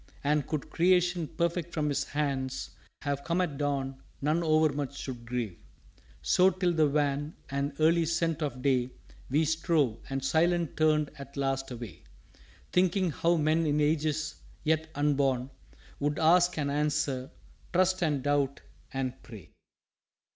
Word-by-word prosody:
And 150 Hz, 0 st, +1 dB
could 155 Hz, -3 st, -4 dB
Creation 175 Hz, -1 st, +3 dB
perfect 170 Hz, +1 st, -1 dB
from 150 Hz, -2 st, 0 dB
his 145 Hz, 0 st, 0 dB
hands 135 Hz, -3 st, -2 dB, 0.3 s
Have 140 Hz, -1 st, -2 dB
come 170 Hz, +1 st, 0 dB
at 155 Hz, -6 st, -1 dB
Dawn, 135 Hz, -2 st, -2 dB, 0.2 s
none 155 Hz, +4 st, +1 dB
overmuch 155 Hz, -4 st, +1 dB
should 120 Hz, -4 st, -7 dB
grieve." 120 Hz, -7 st, -3 dB, 0.6 s
So 185 Hz, +1 st, +5 dB
till 180 Hz, -1 st, 0 dB
the 155 Hz, -2 st, +4 dB
wan 145 Hz, +1 st, 0 dB, 0.2 s
and 140 Hz, +1 st, -1 dB
early 165 Hz, +1 st, +4 dB
scent 165 Hz, -1 st, 0 dB
of 130 Hz, -4 st, -3 dB
day 130 Hz, -2 st, +1 dB, 0.4 s
We 150 Hz, +5 st, +2 dB
strove, 155 Hz, -, +1 dB
and 135 Hz, 0 st, -2 dB
silent 170 Hz, +3 st, +2 dB
turned 155 Hz, -1 st, +2 dB
at 140 Hz, 0 st, -10 dB
last 135 Hz, -1 st, -1 dB
away, 120 Hz, -7 st, -8 dB, 0.7 s
Thinking 185 Hz, 0 st, +2 dB
how 170 Hz, +4 st, +2 dB
men 155 Hz, +1 st, +2 dB
in 150 Hz, 0 st, +2 dB
ages 155 Hz, 0 st, 0 dB, 0.3 s
yet 160 Hz, 0 st, +1 dB
unborn 140 Hz, -3 st, +1 dB, 0.5 s
Would 145 Hz, +1 st, 0 dB
ask 175 Hz, +2 st, +4 dB
and 140 Hz, -2 st, 0 dB
answer 145 Hz, -3 st, 0 dB, 0.4 s
trust 185 Hz, 0 st, +2 dB
and 150 Hz, -6 st, +1 dB
doubt 140 Hz, -1 st, +1 dB, 0.3 s
and 135 Hz, -1 st, -3 dB
pray. 110 Hz, -9 st, -12 dB
150 Hz, 140 wpm, -29 LUFS, 135-165 Hz, 0.7 s, So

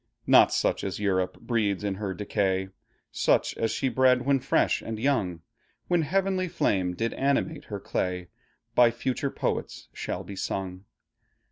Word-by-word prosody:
Not -, -, +6 dB
such -, -, 0 dB
as 95 Hz, 0 st, -3 dB
Europe 95 Hz, -3 st, 0 dB
breeds 105 Hz, -5 st, 0 dB
in 100 Hz, -1 st, 0 dB
her 95 Hz, -3 st, -2 dB
decay; 95 Hz, -1 st, 0 dB, 0.4 s
Such -, -, +2 dB
as 115 Hz, -, 0 dB
she 135 Hz, -, -1 dB
bred 130 Hz, -1 st, +3 dB
when 140 Hz, -1 st, +3 dB
fresh -, -, +1 dB
and 110 Hz, -1 st, -5 dB
young, 105 Hz, -, 0 dB, 0.5 s
When 175 Hz, -1 st, +3 dB
heavenly 185 Hz, +3 st, 0 dB
flame 95 Hz, -, 0 dB
did 115 Hz, +4 st, -1 dB
animate 140 Hz, +3 st, 0 dB
her 100 Hz, -2 st, -5 dB
clay, 90 Hz, -1 st, -3 dB, 0.4 s
By 120 Hz, -1 st, +6 dB
future 130 Hz, +3 st, -2 dB
poets -, -, -3 dB
shall -, -, -4 dB
be 100 Hz, -, -8 dB
sung. 95 Hz, 0 st, -4 dB
110 Hz, 150 wpm, -27 LUFS, 95-135 Hz, 0.5 s, Not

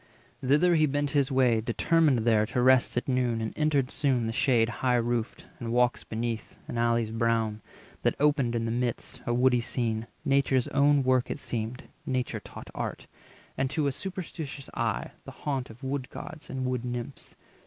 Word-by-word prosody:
290 130 Hz, -, -5 dB, 0.2 s
Thither 175 Hz, -, +4 dB
he 155 Hz, -, +5 dB
bent 145 Hz, 0 st, -1 dB
his 140 Hz, -1 st, +2 dB
way, 125 Hz, -4 st, +3 dB
determined 145 Hz, +5 st, +3 dB
there 110 Hz, -2 st, +4 dB
To 125 Hz, +3 st, -2 dB
rest 130 Hz, -1 st, +4 dB
at 120 Hz, -, -1 dB
noon, 125 Hz, -3 st, +1 dB
and 110 Hz, -1 st, -4 dB
entered 145 Hz, -4 st, +1 dB
soon 130 Hz, -5 st, +1 dB
the 115 Hz, -, -2 dB
shade 115 Hz, -2 st, +3 dB
High 125 Hz, +2 st, 0 dB
roofed, 120 Hz, -1 st, -1 dB
and 115 Hz, -1 st, -4 dB
walks 125 Hz, +1 st, +2 dB
beneath, 115 Hz, 0 st, -4 dB
and 120 Hz, -, -3 dB
alleys 115 Hz, -1 st, +1 dB
brown, 115 Hz, -2 st, 0 dB, 0.4 s
That -, -, +1 dB
opened 140 Hz, -5 st, +2 dB
in 115 Hz, -1 st, 0 dB
the 115 Hz, -, -1 dB
midst 120 Hz, 0 st, -3 dB
a 120 Hz, -, +1 dB
woody 125 Hz, -1 st, +4 dB
scene; 115 Hz, -2 st, -2 dB, 0.2 s
Nature's 135 Hz, -2 st, +2 dB
own 140 Hz, 0 st, +4 dB
work 130 Hz, -1 st, +2 dB
it -, -, -2 dB
seemed 120 Hz, -2 st, -4 dB, 0.2 s
(Nature 130 Hz, -1 st, -1 dB
taught -, -, -11 dB
Art), -, -, -4 dB, 0.5 s
And, 130 Hz, 0 st, 0 dB
to 145 Hz, +2 st, 0 dB
a 140 Hz, -, +2 dB
superstitious 160 Hz, -4 st, -6 dB
eye, -, -, -1 dB
the -, -, -8 dB
haunt 135 Hz, -4 st, -1 dB
Of 115 Hz, +4 st, -14 dB
wood 135 Hz, -1 st, -3 dB
gods 155 Hz, -, -9 dB
and 130 Hz, -1 st, -3 dB
wood 125 Hz, -1 st, -1 dB
nymphs. 120 Hz, +2 st, -6 dB
125 Hz, 185 wpm, -28 LUFS, 115-140 Hz, 0.5 s, he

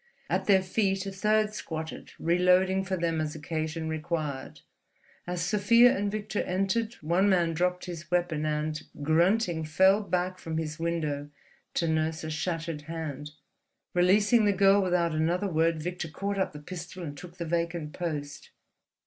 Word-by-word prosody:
At -, -, +1 dB
their 190 Hz, -2 st, +5 dB
feet 195 Hz, 0 st, 0 dB
a 195 Hz, -, -4 dB
third 215 Hz, +2 st, +1 dB
squatted, 160 Hz, -6 st, -6 dB
reloading 180 Hz, +2 st, +3 dB
for 190 Hz, 0 st, -2 dB
them 165 Hz, -2 st, 0 dB
as 155 Hz, -1 st, -3 dB
occasion 160 Hz, +1 st, -3 dB
required. 155 Hz, -4 st, -3 dB, 0.7 s
As 175 Hz, -1 st, -2 dB
Sofia 230 Hz, +6 st, +5 dB
and 205 Hz, 0 st, -1 dB
Victor 210 Hz, 0 st, -2 dB
entered 195 Hz, +5 st, -1 dB
one 175 Hz, +6 st, +2 dB
man 175 Hz, -3 st, +3 dB
dropped 180 Hz, +2 st, 0 dB
his 170 Hz, -2 st, -7 dB
weapon 175 Hz, -4 st, 0 dB
and, 155 Hz, 0 st, -1 dB, 0.2 s
grunting, 170 Hz, +3 st, +2 dB
fell 190 Hz, +6 st, +4 dB
back 185 Hz, -1 st, -1 dB
from 160 Hz, -1 st, -4 dB
his 155 Hz, -1 st, -3 dB
window 155 Hz, -4 st, -2 dB, 0.5 s
to 170 Hz, -, +1 dB
nurse 160 Hz, 0 st, 0 dB
a 155 Hz, -, -4 dB
shattered 165 Hz, 0 st, -3 dB
hand. 150 Hz, -3 st, -5 dB, 0.6 s
Releasing 205 Hz, +5 st, +4 dB
the 205 Hz, -, +4 dB
girl 195 Hz, +1 st, +5 dB
without 175 Hz, -3 st, +1 dB
another 170 Hz, +5 st, +1 dB
word, 165 Hz, -2 st, +1 dB
Victor 175 Hz, -1 st, -3 dB
caught 200 Hz, +5 st, -3 dB
up 190 Hz, -, 0 dB
the 150 Hz, -, -8 dB
pistol 175 Hz, +3 st, -8 dB
and 145 Hz, -3 st, -6 dB
took 175 Hz, +3 st, -11 dB
the 170 Hz, -, -4 dB
vacant 170 Hz, -2 st, -2 dB
post. 150 Hz, -5 st, -5 dB
170 Hz, 155 wpm, -28 LUFS, 160-190 Hz, 0.7 s, their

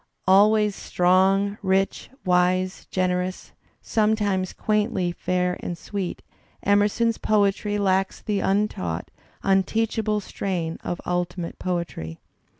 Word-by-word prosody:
Always 210 Hz, +2 st, +5 dB
strong, 190 Hz, +3 st, +2 dB
rich, 195 Hz, 0 st, 0 dB, 0.2 s
wise, 185 Hz, +1 st, +1 dB
generous, 185 Hz, 0 st, -1 dB, 0.3 s
sometimes 210 Hz, -4 st, +1 dB
quaintly 210 Hz, -4 st, 0 dB
fair 180 Hz, +1 st, -1 dB
and 175 Hz, -, -5 dB
sweet, 195 Hz, +1 st, -5 dB, 0.4 s
Emerson's 205 Hz, +3 st, +2 dB
poetry 205 Hz, 0 st, +1 dB
lacks 195 Hz, -1 st, +1 dB
the 205 Hz, -2 st, -1 dB
untaught, 195 Hz, -, -1 dB, 0.3 s
un 195 Hz, 0 st, +4 dB
teachable 220 Hz, +1 st, 0 dB
strain 180 Hz, -5 st, -3 dB
of 175 Hz, -, -3 dB
ultimate 175 Hz, -1 st, -3 dB
poetry. 170 Hz, -, -4 dB
190 Hz, 100 wpm, -24 LUFS, 180-205 Hz, 0.4 s, Always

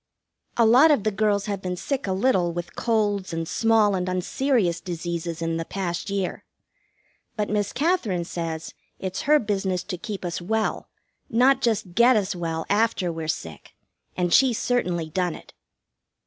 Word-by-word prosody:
A 235 Hz, -, +5 dB
lot 255 Hz, +8 st, +7 dB
of 285 Hz, -9 st, +3 dB
the 215 Hz, -, +1 dB
girls 205 Hz, 0 st, +1 dB
have 200 Hz, -3 st, -3 dB
been 180 Hz, -1 st, -3 dB
sick 275 Hz, +3 st, -3 dB
a -, -, 0 dB
little 190 Hz, -3 st, +2 dB
with 175 Hz, 0 st, -6 dB
colds 205 Hz, -5 st, 0 dB
and 165 Hz, 0 st, -3 dB
small 225 Hz, -1 st, +3 dB
and 185 Hz, -1 st, -1 dB
unserious 185 Hz, 0 st, 0 dB
diseases 170 Hz, -1 st, -4 dB
in 165 Hz, 0 st, -1 dB
the 165 Hz, -, -2 dB
past 175 Hz, 0 st, -4 dB
year. 195 Hz, -2 st, -2 dB, 0.9 s
But 210 Hz, -2 st, -2 dB
Miss 205 Hz, -1 st, 0 dB
Katherine 255 Hz, -, 0 dB
says 165 Hz, -2 st, -5 dB, 0.2 s
it's 190 Hz, 0 st, -4 dB
her 300 Hz, -, +7 dB
business 195 Hz, -6 st, -1 dB
to 180 Hz, -4 st, -6 dB
keep 205 Hz, -3 st, -5 dB
us 175 Hz, 0 st, -3 dB
well, 220 Hz, +5 st, -1 dB, 0.4 s
not 260 Hz, +3 st, +4 dB
just 220 Hz, -7 st, 0 dB
get 240 Hz, +5 st, +5 dB
us 205 Hz, -1 st, +1 dB
well 165 Hz, -2 st, -3 dB
after 205 Hz, -4 st, +1 dB
we're 160 Hz, -1 st, -5 dB
sick, 80 Hz, -, -5 dB, 0.4 s
and 175 Hz, -1 st, +1 dB
she's 255 Hz, -4 st, +5 dB
certainly 180 Hz, -11 st, 0 dB
done 180 Hz, -1 st, -1 dB
it. -, -, -14 dB
195 Hz, 165 wpm, -24 LUFS, 175-225 Hz, 0.9 s, lot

